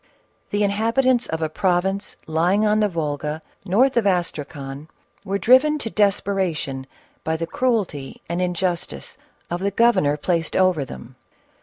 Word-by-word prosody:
The 205 0 0
inhabitants 230 +5 +2
of 160 0 -3
a - - +1
province 190 +4 -1
lying 175 +7 +2
on 210 0 +3
the 210 -1 +2
Volga, 150 -2 -3 0.2
north 235 +8 +3
of 220 -4 +3
Astracan, 150 -5 -3 0.4
were 200 -1 -1
driven 260 +8 +5
to 225 -6 -4
desperation 190 -9 0 0.4
by 160 0 -1
the 165 - -2
cruelty 190 - -1
and 170 +2 -2
injustice 175 - -2 0.3
of 175 - -1
the 195 +2 0
governor 200 -9 +3
placed 165 +1 -1
over 185 -6 +3
them. 65 - -11
185 Hz, 140 wpm, -22 LUFS, 160-210 Hz, 0.4 s, driven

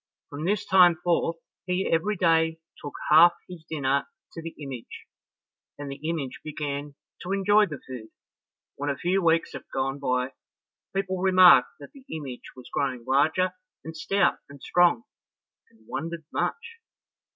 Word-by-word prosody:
From 145 +3 -5
this 205 +2 0
time 180 -2 +6
forth, 170 -1 +1 0.3
he 180 +1 0
every 190 +6 +1
day 165 -2 +2 0.2
took 145 - -8 0.2
half 170 +3 +8
his 180 -3 -10
dinner 140 -3 0 0.3
to 165 - -7
the 165 0 -8
image, 135 -5 -8 0.7
and 145 -1 -6
the 145 +3 -5
image 145 -6 -4
began 145 -1 -5 0.3
to 180 - -5
enjoy 205 +2 +4
the 150 -4 -7
food. 125 -4 -8 0.7
When 145 +1 -3
a 140 - -2
few 185 +3 0
weeks 165 -1 +2
had - - -8
gone 135 +1 -2
by, 125 -1 -1 0.6
people 190 -1 -1
remarked 185 -7 +7
that 140 - -12
the 275 - -15
image 140 -6 -6
was 125 -1 -12
growing 130 -4 -2
larger 155 +7 +2 0.3
and 160 0 -8
stout 195 +4 +1
and 140 0 -12
strong, 175 -9 +3 0.7
and 110 -1 -26
wondered 165 +2 -5
much. 460 0 -3
160 Hz, 150 wpm, -26 LUFS, 140-180 Hz, 0.7 s, half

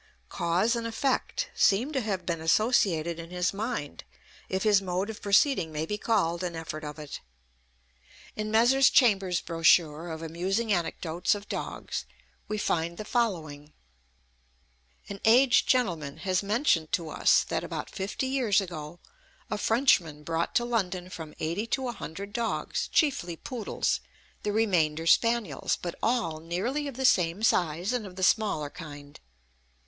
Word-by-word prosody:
Cause 180 +8 +1
and 230 -1 -2
effect 275 - -1
seem 230 +9 +3
to 265 - 0
have 195 -5 -3
been 170 -2 -2
associated 170 -3 +2
in 165 0 -8
his 180 +1 -1
mind, 210 - -4 0.5
if 190 0 -1
his 210 -2 +4
mode 190 +3 -2
of 215 - -11
proceeding 200 - +3
may 155 +1 -2
be 210 - -2
called 175 -7 0
an 175 -2 -3
effort 155 -1 -6
of 150 0 -6
it. 150 -2 -8 1.1
In 215 0 -3
Messrs. 240 +5 +5
Chambers' 195 -8 +3
brochure 165 -1 +2
of 160 0 -6
amusing 190 +7 -1
anecdotes 175 +3 0
of 205 0 -9
dogs - - -4 0.4
we 215 - -2
find 170 -4 -1
the 215 - -6
following: 155 - -2 1.3
An 200 - -7
aged 245 +3 +5
gentleman 170 - +1
has 185 -1 +1
mentioned 200 - +1
to 165 -3 -1
us - - +4
that, - - -3
about - - -5
fifty 200 +6 -3
years 260 -7 +2
ago, 170 -4 -6 0.5
a 210 - 0
Frenchman 190 - +2
brought 165 +2 -2
to 240 - +3
London 185 -6 -2
from 160 -4 -8
eighty 175 +8 -2
to 260 +2 -1
a - - -1
hundred 200 0 -7
dogs, 235 -1 -2
chiefly 220 - +1
poodles, 230 +5 -2 0.4
the 210 - -1
remainder 170 -8 +1
spaniels, 230 +5 +2
but 175 -1 -4
all 225 -10 0
nearly 205 - -2
of 275 - -6
the 265 - -1
same 180 -2 +3
size, 175 +1 +1
and 235 -5 -2
of 180 - -12
the 185 - -4
smaller 180 -9 +2
kind. 145 -3 -10
190 Hz, 155 wpm, -28 LUFS, 165-225 Hz, 1.3 s, Messrs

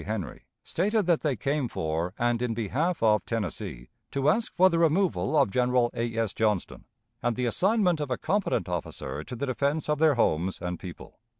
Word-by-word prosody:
Henry, 105 -5 -4 0.2
stated 210 +4 0
that 170 -2 +3
they 145 -4 0
came 140 +4 -1
for 80 -1 -2
and 120 0 +1
in 120 -2 -1
behalf 140 - -1
of 105 -1 +4
Tennessee 90 - -4 0.2
to 140 +1 +1
ask 220 +8 +1
for 185 - +6
the 170 -3 +1
removal 165 0 +2
of 140 -9 +3
General 125 0 +2
A. 115 -1 -3
S. 115 -3 0
Johnston, 105 -4 -1 0.4
and 120 -1 0
the 125 - -1
assignment 180 - +2
of 145 -2 -3
a 125 - -1
competent 200 - 0
officer 85 -3 -4
to 125 - -7
the 135 +4 -2
defense 140 +4 -1
of 150 -1 0
their 155 -3 +4
homes 95 -5 +1
and 90 -1 -4
people. 90 -4 -10
125 Hz, 190 wpm, -27 LUFS, 105-160 Hz, 0.4 s, for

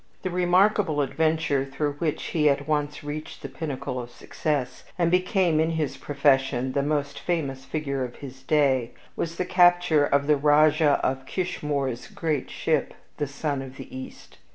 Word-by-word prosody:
The 185 - -2
remarkable 180 -2 +3
adventure 155 -1 +1
through 140 +2 -2
which 160 -2 -1
he 150 -2 +2
at 140 +1 0
once 150 -1 -1
reached 150 +1 -7
the - - -3
pinnacle 135 -4 -4
of 120 -1 -7
success, 135 +2 -3
and 170 -2 +2
became 180 -3 +2
in 160 +1 +2
his 155 -5 -2
profession 135 -2 +1
the 140 - 0
most 145 -1 -1
famous 140 -6 -2
figure 140 -4 -2
of 125 -1 -6
his 135 -1 -10
day, 135 -5 +2 0.2
was 165 0 -3
the 180 - -2
capture 175 -4 +4
of 140 0 +2
the 150 0 +3
Rajah 150 +1 +4
of 130 0 -1
Kishmoor's 145 -8 -2
great 155 -5 -2
ship, - - -1 0.2
The 145 - -1
Sun 140 0 -3
of 130 -1 -9
the 135 - -10
East. 130 - -10
145 Hz, 165 wpm, -25 LUFS, 135-160 Hz, 0.2 s, capture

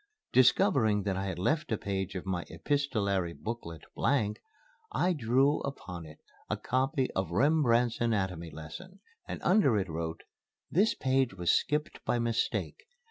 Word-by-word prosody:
Discovering 110 -4 +4
that 95 -1 -1
I 95 +1 -2
had 95 -3 -3
left 150 - 0
a 110 - +2
page 95 -1 -3
of 90 - -4
my 90 -2 -2
epistolary 100 - 0
booklet 95 -6 -6
blank, 110 -7 0 0.5
I 180 - +2
drew 135 +1 +2
upon 90 - -6
it 75 0 -13 0.3
a - - 0
copy 130 +1 0
of 95 -3 -2
Rembrandt's 120 - +3
Anatomy 95 -7 0
Lesson, 130 - -10 0.3
and - - -5
under 180 - +4
it 95 -1 -1
wrote: 80 0 -4 0.5
"This 205 +7 +3
page 130 -5 +1
was 90 -2 +2
skipped 150 +1 0
by - - +1
mistake. 120 - -1
115 Hz, 145 wpm, -30 LUFS, 95-140 Hz, 0.5 s, Discovering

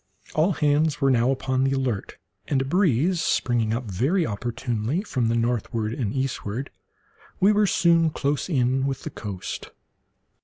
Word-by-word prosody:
All 165 +5 +2
hands 150 0 +1
were 135 -2 +3
now 120 0 +3
upon 130 -1 0
the 135 0 +2
alert, 130 -7 -2 0.3
and, 140 - +1
a 135 - -1
breeze 170 - +2
springing 115 -7 +1
up 115 +3 -1
very 130 - 0
opportunely 120 - -2
from 130 - -1
the 115 - +1
northward 115 -1 -1
and 115 -5 -2
eastward, 130 -1 -3 0.7
we 195 +3 +5
were 210 0 +3
soon 170 -3 +3
close 145 +2 -2
in 130 -2 +1
with 135 -1 -3
the 155 - -5
coast. 100 -7 -6
130 Hz, 155 wpm, -24 LUFS, 115-155 Hz, 0.7 s, we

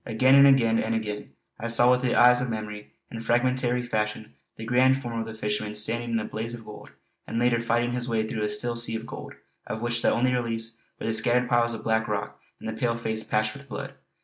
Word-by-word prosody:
Again, 130 +4 +3
and 140 0 +8
again, 115 -5 +4
and 115 +1 -1
again, 105 -2 -4 0.3
I 115 - -3
saw 120 +1 +4
with 125 0 +3
the 125 -2 0
eyes 125 0 +6
of 125 - -2
memory, 105 -2 -6 0.2
in 115 - -6
fragmentary 125 +1 +1
fashion, 110 -2 -3 0.2
the 110 - -8
grand 130 +3 +3
form 120 -3 -4
of 115 - -4
the 110 - -7
fisherman 105 0 -3
standing 120 +3 0
in 115 -1 0
a 105 - -4
blaze 115 +2 -5
of 115 -2 -13
gold, 105 - -12 0.3
and - - -4
later 120 -1 +2
fighting 120 +1 0
his 125 0 -2
way 110 -1 0
through 110 - -4
a 105 - 0
still 120 +3 0
sea 115 -1 +2
of 110 0 -5
gold, - - -9 0.3
of 110 +2 -4
which 120 0 0
the - - +3
only 125 +2 +2
reliefs 115 -2 -3 0.2
were - - -5
the 115 - 0
scattered 120 +3 +2
piles 120 -1 +2
of 110 - -9
black 110 0 +1
rock - - -4 0.2
and - - -8
the 110 - -3
pale 115 +1 -1
face 110 -1 -2
patched 110 0 0
with 140 -1 -13
blood. - - -6
115 Hz, 240 wpm, -26 LUFS, 110-120 Hz, 0.3 s, and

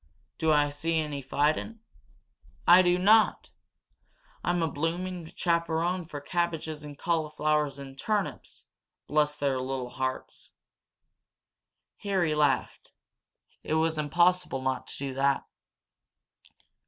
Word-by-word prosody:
Do 160 -1 +2
I 145 -1 +3
see 160 +3 -1
any 150 -3 -2
fightin'? 150 - 0 0.9
I 175 +2 +9
do 180 -1 +3
not! 215 +4 +4 0.9
I'm 175 -1 +1
a - - +2
bloomin' 165 +3 -3
chaperone 170 +1 0
for 150 -3 -6
cabbages 160 -1 -2
and 145 -1 -9
cauliflowers 155 -3 0
and 135 -1 -10
turnips, 210 +5 -3 0.4
bless 150 0 +1
their 135 -2 0
little 130 -1 -4
hearts!" 130 0 -5 1.4
Harry 190 -6 0
laughed. 150 -2 0 0.7
It 155 - -2
was 160 0 +1
impossible 170 -2 +2
not 130 0 -2
to - - -6
do 135 -1 -4
that. 135 +1 +1
155 Hz, 110 wpm, -28 LUFS, 145-175 Hz, 1.4 s, I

